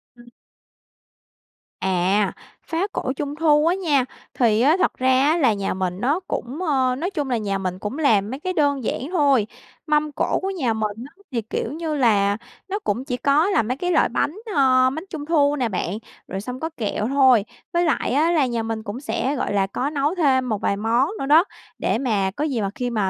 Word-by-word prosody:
Ừm. 240 0 -16 1.5
À, 190 +2 +1 0.3
phá 335 +4 -1
cổ 260 - -2
Trung 290 +1 -4
thu 305 -1 +3
á 345 - +3
nha, 300 -9 +1 0.3
thì 225 -3 +2
á 300 +7 +4
thật 370 - +1
ra 260 0 +3
á 310 +4 +3
là 260 -9 +3
nhà 200 -1 -2
mình 185 -1 -3
nó 285 +7 +1
cũng, 260 +5 -4
ơ, 260 -6 +1
nói 335 +8 -2
chung 295 -8 -3
là 245 - +1
nhà 200 -3 -2
mình 185 -1 -4
cũng 210 +8 -5
làm 215 -9 +3
mấy 265 - -5
cái 370 +4 -3
đơn 285 -5 +1
giản - - -2
thôi, 280 - +3 0.4
mâm 300 0 +1
cổ - - 0
của 385 - -2
nhà 285 -12 -1
mình 215 -1 -2 0.2
á 400 - -24
thì, 235 -3 -1
kiểu 225 +2 -4
như 320 -1 -3
là, 205 -6 +3 0.3
nó 400 +2 -2
cũng 235 +6 -1
chỉ 250 -2 -2
có 290 +7 +3
là 385 - +2
mấy 250 +4 -3
cái 355 +4 -1
loại 325 - +3
bánh, 290 +6 -1 0.2
ơ, 255 -2 +4
bánh 310 +5 -5
Trung 305 -4 -6
thu 295 -3 +3
nè 250 -5 -1
bạn, 185 0 -2 0.3
rồi 190 +1 -4
xong 250 +4 -6
có 320 - -3
kẹo 210 -1 -2
thôi. 260 -5 +4 0.3
Với 345 0 +2
lại 315 - 0
á 310 +5 +3
là 310 -5 +3
nhà 235 -2 -2
mình 225 -1 -4
cũng 215 +3 -6
sẽ, 280 0 -1
gọi 255 - -2
là, 195 -1 +2
có 255 +8 -2
nấu 295 +3 0
thêm 265 -7 +2
một 215 -3 -2
vài 200 - 0
món 230 +7 +1
nữa - - -2
đó, 305 +4 +6 0.3
để - - 0
mà 210 -7 0
có 295 - -2
gì 265 -7 -1
mà 200 - -1
khi 250 -1 -2
mà 210 -5 0
260 Hz, 225 wpm, -22 LUFS, 220-300 Hz, 1.5 s, đó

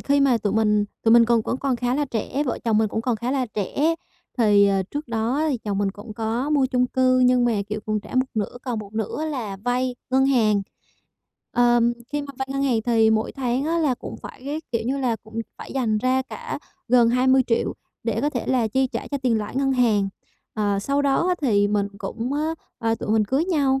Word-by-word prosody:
khi 280 0 +2
mà 260 -4 +4
tụi 205 -2 -1
mình 210 -1 +3 0.2
tụi 225 - +4
mình 235 0 +8
còn 235 -1 +3
vẫn 250 - -1
còn 265 -2 -1
khá 245 +1 0
là 290 +1 +1
trẻ, 260 +3 -2
vợ 250 - -2
chồng 220 -2 +3
mình 220 -1 +2
cũng 220 - -2
còn 240 -3 0
khá 240 +4 -3
là 265 -2 0
trẻ, 275 - 0 0.4
thì, 205 -3 +5
ờ, 195 -1 +2
trước 290 +8 -6
đó 230 +6 0
thì 255 - -1
chồng 205 -2 -3
mình 200 -1 +1
cũng 210 +2 -10
có 230 +6 -2
mua 280 -3 +3
chung 250 -1 +1
cư 255 0 +2
nhưng 250 -1 +4
mà, 240 - +2 0.2
kiểu, 210 0 -3
còn 215 0 0
trả 215 - -11
một 255 +1 +3
nửa, 215 +3 -2
còn 245 -4 -3
một 205 -1 -8
nửa 220 +8 -2
là 230 -10 -4
vay 245 +4 -1 0.2
ngân 265 +1 +4
hàng. 215 -6 +3 0.9
Ờm, 240 0 +4 0.2
khi 295 - 0
mà 280 -1 -8
vay 265 0 -3
ngân 275 0 -1
hàng 240 -5 +1
thì 225 -2 +3
mỗi 220 0 0
tháng 260 0 -1
á 330 +2 0
là 300 -6 +2
cũng - - -8
phải, - - -10
cái 295 +3 -3
kiểu 230 - 0
như 275 +2 0
là, 245 -4 0
cũng 220 +1 -7 0.2
phải - - -9
dành 225 -5 +1
ra 255 +2 +1
cả 465 - -6 0.3
gần 240 -1 +5
20.000.000 255 -1 +2 0.3
để 230 -1 0
có 295 +2 +1
thể 245 - -3
là 245 -4 +2
chi 265 +4 +1
trả - - -5
cho 280 - -2
tiền 235 -4 +2
lãi 210 +5 -5
ngân 270 0 +2
hàng. 220 -6 +2 0.5
Ờ, 205 -2 0
sau 280 +8 0
đó 280 +5 +2
á 365 - +3
thì 205 -5 +3
mình 205 -1 0
cũng, 230 +5 -4 0.5
ờ, 225 0 +1
tụi 215 - -5
mình 220 -1 +3
cưới 270 +9 +1
nhau 280 -7 +1
245 Hz, 235 wpm, -23 LUFS, 220-265 Hz, 0.9 s, mình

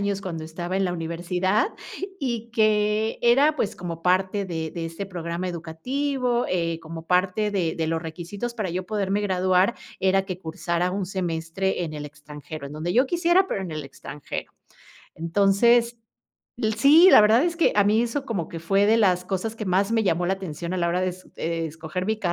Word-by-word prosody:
años 200 -1 -1
cuando 165 -4 -5
estaba 175 +3 -4
en 195 - +1
la 180 - 0
universidad, 175 - 0 0.5
y 235 -3 -3
que 215 0 +2
era, 280 +6 +4
pues, 215 - -1
como 170 -2 -6
parte 190 +3 +1
de 160 -3 -4
de 170 -2 -5
este 165 +4 -5
programa 175 -1 -4
educativo, 245 - -2
eh, 170 -2 -1
como 165 0 -9
parte 185 +4 +1
de 180 -5 0
de 160 - -2
los 165 0 0
requisitos, 175 +8 -6
para 215 -6 -3
yo 180 +2 -3
poderme 200 -1 0
graduar, 185 +1 +2 0.2
era 190 0 +3
que 185 -2 -5
cursara 170 +1 -2
un 195 -1 -2
semestre 180 0 -2
en 160 -3 -4
el 150 -1 -6
extranjero, 150 0 -9
en 140 - -9
donde 160 +4 -3
yo 250 +7 +4
quisiera, 345 +4 +3
pero, 195 - -2
en 185 - -5
el 155 -1 -5
extranjero. 135 +1 -7 0.6
Entonces, 205 +8 +3 0.8
sí, 300 +10 +7
la - - +9
verdad 220 +4 +5
es 340 -1 -1
que, 335 - +3
a 205 - +6
mí 215 +3 +3
eso, 260 +4 -2
como 195 -10 -3
que 165 - -6
fue 195 +5 +2
de 220 +2 +5
las 180 -4 +3
cosas, 195 +4 -3
que 215 - -4
más 195 +2 +1
me 225 -1 +2
llamó 175 -2 +1
la 190 - +2
atención 170 -2 -5
a - - -1
la 170 -1 +1
hora 180 +1 0
de 185 - +1
es 185 0 -9
de 165 0 -2
escoger 160 +3 -5
mi 220 0 0
185 Hz, 195 wpm, -24 LUFS, 165-215 Hz, 0.8 s, la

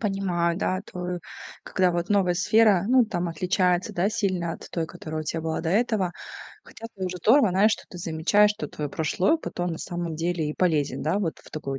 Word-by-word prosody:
Понимаю, 185 -5 0
да, 185 -1 0
твою 180 -2 -5 0.4
когда 185 -1 +1
вот 175 +1 -2
новая 195 -3 +3
сфера, 210 -1 +4
ну, 255 0 +5
там 175 -5 -2
отличается, 180 +2 0
да, 180 +3 +1
сильно 185 -6 -1
от - - -10
той, 165 -2 -2
которая 155 -2 -6
у - - -11
тя 160 +2 -2
была 160 0 -2
до 160 - -3
этого. 205 -3 +1 0.5
Хотя 230 - -10
тоже 185 -1 -3
здорово, 225 - +5
знаешь, 200 +4 +4
что - - -4
ты - - -11
замечаешь, 175 +6 +3
что 210 +1 -4
твой 150 -1 -5
прошлый 160 - +1
опыт, 315 - -5
он, 175 - 0
на 160 - -5
самом 175 -3 -4
деле, 165 -1 -1
и - - -6
полезен, 160 -6 +1
да, 160 +7 +1
вот 165 -5 -2
в - - -17
такой 135 -3 -4
180 Hz, 210 wpm, -25 LUFS, 165-200 Hz, 0.5 s, ну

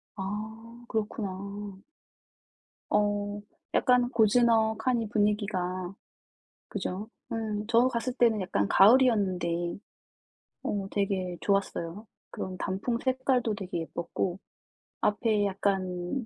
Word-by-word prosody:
아. 220 +4 -6
그렇구나. 200 -2 -4 1.1
어. 205 0 +1 0.3
약간 250 -1 +4
고즈넉하니 225 0 +3
분위기가 200 -4 0 0.7
그죠? 200 +1 -4 0.2
음. 215 -2 -2
저 235 +2 +5
갔을 250 0 -2
때는 230 -5 +3
약간 100 - 0
가을이었는데 190 - +4 0.9
어 200 -1 -2
되게 190 -3 -1
좋았어요. 195 -1 -1 0.2
그런 185 0 -5
단풍 200 +5 -1
색깔도 255 -3 +1
되게 190 -4 -4
예뻤고 170 +2 -3 0.6
앞에 210 0 +2
약간 190 +3 -1
205 Hz, 205 characters per minute, -29 LUFS, 190-230 Hz, 1.1 s, 저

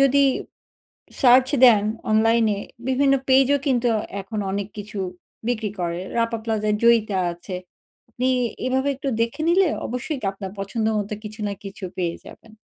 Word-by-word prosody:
যদি 275 +1 +5 1.0
সার্চ 255 0 +6 0.2
দেন 215 -5 +7 0.3
অনলাইন 225 +1 +4
এ - - -5 0.3
বিভিন্ন 275 +1 +3
পেজ 265 0 +6
ও - - -2
কিন্তু 245 -2 +2 0.3
এখন 215 +3 -6
অনেক 200 0 -2
কিছু 205 0 -7 0.5
বিক্রি 220 -4 -1
করে। 170 0 -2 0.2
রাপা 230 0 0
প্লাজায় 215 -2 0
জয়িতা 225 -4 +4 0.2
আছে। 180 +2 -7 0.7
নি 260 - +3 0.4
এভাবে 265 +2 +1
একটু 275 0 -3
দেখে 235 +7 -1
নিলে 370 +1 +4 0.2
অবশ্যই 250 +5 -3
কি - - -4
আপনার 195 -1 -7
পছন্দ 205 +3 -2
মতো 205 0 -3
কিছু 215 +1 -9
না 200 - -2
কিছু 195 0 -9
পেয়ে 170 -2 -1
যাবেন। 225 - -14
225 Hz, 155 wpm, -23 LUFS, 205-260 Hz, 1.0 s, দেন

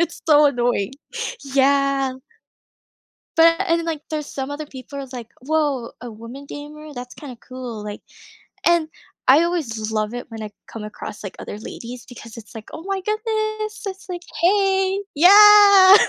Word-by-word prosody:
It's 335 0 -3
so 300 -1 +6
annoying. 245 -4 0 0.5
Yeah. 275 -1 +2 1.2
But 330 +2 +6
and 335 - +3
then, 335 - -4
like, 315 -3 -3
there's 305 -1 -3
some 270 -1 -5
other 295 +1 -5
people 275 0 -10
are 275 - -5
like, 235 -2 -7 0.2
"Woah, 290 -6 0
a 245 - -7
woman 230 +6 -10
gamer? 300 +1 -9
That's 245 0 -7
kinda 265 -5 -10
cool," 250 -4 -7
like 210 0 -7 0.6
and 340 -2 +4 0.4
I 285 +6 +7
always 335 -10 -1 0.2
l - - -3
love 215 +2 -1
it 245 - -6
when 225 -1 -7
I 210 - -7 0.2
come 225 - -8
across, 210 0 -8
like, 195 - -7
other - - -7
ladies 240 +2 -8
because 230 -2 -11
it's 225 -1 -12
like, 220 - -9
"Oh 320 - -7
my 390 0 -2
goodness!" 435 +1 -2
It's 385 0 -7
like, 350 -1 -5 0.2
"Hey!" 385 +1 +2
Yeah. 400 +2 +9
290 Hz, 170 wpm, -21 LUFS, 245-355 Hz, 1.2 s, Yeah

